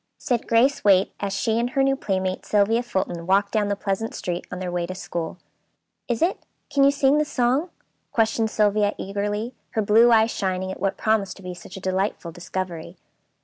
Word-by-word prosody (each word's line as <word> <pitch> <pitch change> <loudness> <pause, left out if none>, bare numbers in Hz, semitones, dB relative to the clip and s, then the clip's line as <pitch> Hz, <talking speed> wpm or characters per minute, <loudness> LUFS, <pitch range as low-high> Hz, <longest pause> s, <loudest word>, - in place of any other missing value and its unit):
said 240 -2 -1
Grace 245 +5 +3
Waite, 195 -2 +4
as 200 -1 -2
she 220 +4 0
and 240 +1 0
her 270 +1 +1
new 270 0 +3
playmate, 190 -6 -2
Sylvia 215 +3 +2
Fulton, 180 -7 -3
walked 200 +1 +3
down 210 -2 +1
the 200 - 0
pleasant 200 +2 -3
street 175 -1 -4
on 180 - -4
their 180 -1 -4
way 175 -1 -2
to 185 - -6
school. 175 -4 -5 0.7
"Is 240 +2 0
it? 355 - +1 0.3
Can 280 -1 +3
you 275 - +7
sing 280 +1 +3
the - - +3
song?" 275 +3 0 0.4
questioned 225 0 +1
Sylvia 210 -1 +2
eagerly, 205 +4 -3 0.2
her 220 - +1
blue 225 +4 +5
eyes 225 0 +5
shining 185 -1 -2
at - - -7
what 195 +1 -1
promised 215 -3 0
to 195 - -14
be 180 0 -5
such 180 +2 -11
a - - -6
delightful 185 -2 -2
discovery. 175 -1 -5
205 Hz, 195 wpm, -24 LUFS, 185-230 Hz, 0.7 s, you